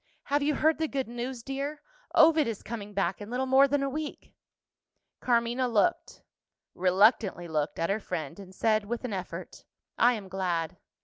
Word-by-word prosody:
"Have 290 +1 0
you 290 +1 +1
heard 315 +2 +2
the 320 - +1
good 270 -4 -2
news, 240 +1 -5
dear? 280 +3 -4 0.3
Ovid 315 -3 +6
is 225 -3 -4
coming 210 -3 -7
back 195 0 -1
in 205 - -7
little 250 +2 -1
more 265 +1 +5
than 280 0 0
a - - 0
week." 300 +2 -6 0.9
Carmina 240 +1 +1
looked 235 +9 0 0.5
reluctantly 190 0 +3
looked 155 -2 -2
at 165 +3 0
her 205 - 0
friend, 165 -3 -5
and 190 -1 -12
said, 215 -1 +2
with 240 +4 -4
an 235 - -3
effort, 185 -2 -6 0.4
"I 245 +1 +6
am 210 -4 -6
glad." 180 -2 -2
235 Hz, 175 wpm, -28 LUFS, 195-270 Hz, 0.9 s, Ovid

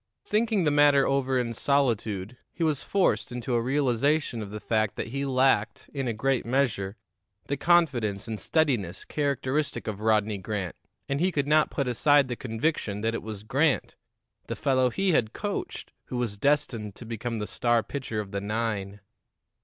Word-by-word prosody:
Thinking 215 -2 +1
the 150 - +3
matter 145 -1 +5
over 135 -1 +1
in 120 -2 -1
solitude, 115 -6 0 0.2
he 170 - -3
was 155 -4 +1
forced 195 -8 +1
into 125 +1 -3
a 120 - +2
realization 135 0 +1
of 105 - -6
the 105 +1 -6
fact 110 -1 0
that - - -4
he 140 +3 -2
lacked, 130 -5 +1
in 135 -3 -2
a - - +1
great 130 +4 0
measure, 115 -6 0 0.5
the 140 - -1
confidence 130 - +2
and 110 -2 -4
steadiness 120 - 0
characteristic 140 0 -1
of 105 -2 -4
Rodney 110 -2 +2
Grant, 95 -2 -4 0.3
and 140 0 -1
he 185 +3 +2
could 145 -4 -1
not 155 +1 +4
put 140 - -2
aside 140 +2 +4
the 125 - -2
conviction 115 -3 -2
that 115 +1 0
it - - -3
was 105 -2 -7
Grant, 140 +6 +1 0.5
the - - -3
fellow 130 -2 +2
he 190 +9 +1
had 115 -8 +1
coached, 205 -1 -4
who 125 - -5
was 120 -4 -1
destined 120 -5 0
to 120 - -10
become 115 +1 -4
the 105 - -2
star 120 +1 +1
pitcher 130 -6 -4
of 100 -2 -5
the 100 -1 -3
nine. 105 -2 -3
125 Hz, 175 wpm, -27 LUFS, 110-140 Hz, 0.5 s, matter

